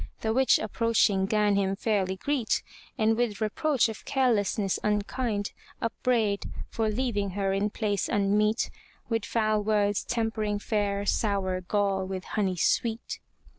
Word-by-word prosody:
The 220 0 0
witch 265 +2 +5
approaching 215 -3 +2
gan 210 -1 +2
him 195 -1 +1
fairly 195 -3 0
greet, 255 +2 0 0.3
And 220 +1 +3
with 230 -3 -1
reproach 245 +5 +1
of 220 -2 -7
carelessness 210 -6 +1
unkind, 210 0 -1 0.3
Upbraid, 225 -3 0 0.2
for 220 -1 0
leaving 215 -3 -1
her 195 -1 +1
in 200 +2 +1
place 205 -3 -1
unmeet, 210 +2 +2 0.4
With 225 -1 0
foul 215 -2 +1
words 205 -1 +1
tempering 220 -3 -1
fair, 205 -1 -1
sour 195 -4 0
gall 195 0 0
with 190 -1 -4
honey 190 -4 0
sweet. 225 +6 0
210 Hz, 130 wpm, -28 LUFS, 200-225 Hz, 0.4 s, witch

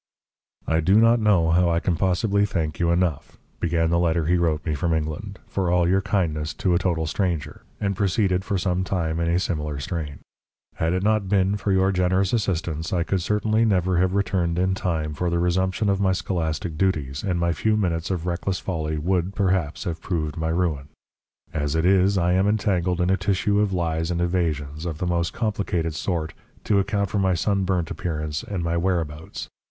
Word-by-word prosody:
"I 80 +2 +1
do 90 +5 +3
not 115 +1 +5
know 95 -7 +3
how 90 +1 +3
I 85 0 +2
can 85 0 0
possibly 100 +3 +1
thank 80 -6 -2
you 85 - +2
enough," 85 -3 0 0.2
began 80 -1 +1
the 85 - +3
letter 85 -2 +1
he 90 +3 +3
wrote 80 -3 0
me 80 - 0
from 80 +3 0
England, 80 +6 -4
"for 95 -3 -1
all 90 -1 +3
your 95 +2 +3
kindness 85 -6 -1
to 95 -3 +1
a 85 - +3
total 85 -4 0
stranger," 80 -3 -2 0.2
and 100 -1 -1
proceeded 95 -1 +1
for 100 -1 -1
some 90 0 0
time 85 -4 -1
in 85 0 0
a 85 - +2
similar 75 -6 -2
strain. 75 -1 -4 0.6
"Had 80 +1 0
it 95 +1 0
not 105 -2 +1
been 100 0 +2
for 100 0 -1
your 95 0 +3
generous 95 +1 +1
assistance, 85 -7 -1
I 85 -2 +1
could 95 +1 -1
certainly 110 +4 +1
never 95 -4 +2
have 95 +1 +1
returned 90 -4 0
in 95 +1 +2
time 80 -5 -2
for 90 +4 -1
the 85 - 0
resumption 95 +4 +1
of 100 0 +1
my 95 -1 +3
scholastic 85 -2 -2
duties, 75 -8 0
and 90 -4 -1
my 85 0 +1
few 110 +4 +1
minutes 85 -5 -1
of 90 -3 -2
reckless 90 +2 -1
folly 80 -4 -3
would, 90 +4 -1
perhaps, 95 -7 0
have 85 -2 -4
proved 80 -5 -2
my 80 0 -2
ruin. 80 -5 -1 0.7
As 75 -1 -1
it 80 +1 +1
is, 95 +1 +4
I 90 0 +2
am 95 +2 +3
entangled 95 -4 +1
in 90 +1 +2
a 95 - +3
tissue 100 +2 +1
of 105 -1 +2
lies 80 -2 -1
and 85 -1 -1
evasions, 80 -3 -1
of 80 -3 -4
the 90 - -3
most 85 -1 0
complicated 95 -7 -1
sort, 80 0 -2 0.3
to 100 - +2
account 100 0 -1
for 105 - 0
my 95 -2 +2
sunburnt 95 -2 0
appearance 75 -3 -3
and 95 -4 -4
my 85 0 -1
whereabouts. 85 -3 -2
90 Hz, 200 wpm, -24 LUFS, 80-95 Hz, 0.7 s, not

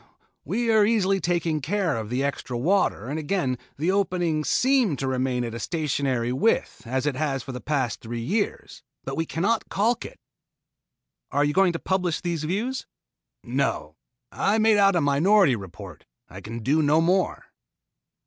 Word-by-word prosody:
We 230 - 0
are 220 -1 +5
easily 200 -3 +2
taking 170 -4 0
care 180 +2 0
of 110 -2 -4
the 125 +3 -1
extra 140 -3 -3
water 165 - +1
and 145 +4 -3
again 145 -6 -1 0.2
the 165 +6 +1
opening 175 -5 0
seems 250 - +2
to 135 - -2
remain 130 -1 0
at 115 -1 -4
a 115 - -5
stationary 135 -7 -1
width 130 - 0
as 130 +3 -1
it 145 -3 0
has 135 -2 -1
for 135 - -7
the 125 -1 -7
past 135 -6 -1
three 120 +1 -5
years. 200 - -2 0.2
But - - -4
we 165 0 -2
cannot 205 +8 0
caulk 230 +4 +1
it." - - -10 1.1
"Are 145 +1 +2
you 145 - 0
going 190 0 +3
to - - -2
publish 180 -2 -1
these 170 -3 -3
views?" 225 +10 -2 0.6
"No. 120 - -2 0.4
I 205 +2 +1
made 220 -1 +4
out 195 -2 +5
a 175 - +3
minority 150 - +4
report. 95 -4 -10 0.2
I 95 +5 -10
can 115 +3 -7
do 150 +6 +2
no 150 +1 +3
more." 180 +3 0
155 Hz, 170 wpm, -25 LUFS, 130-195 Hz, 1.1 s, are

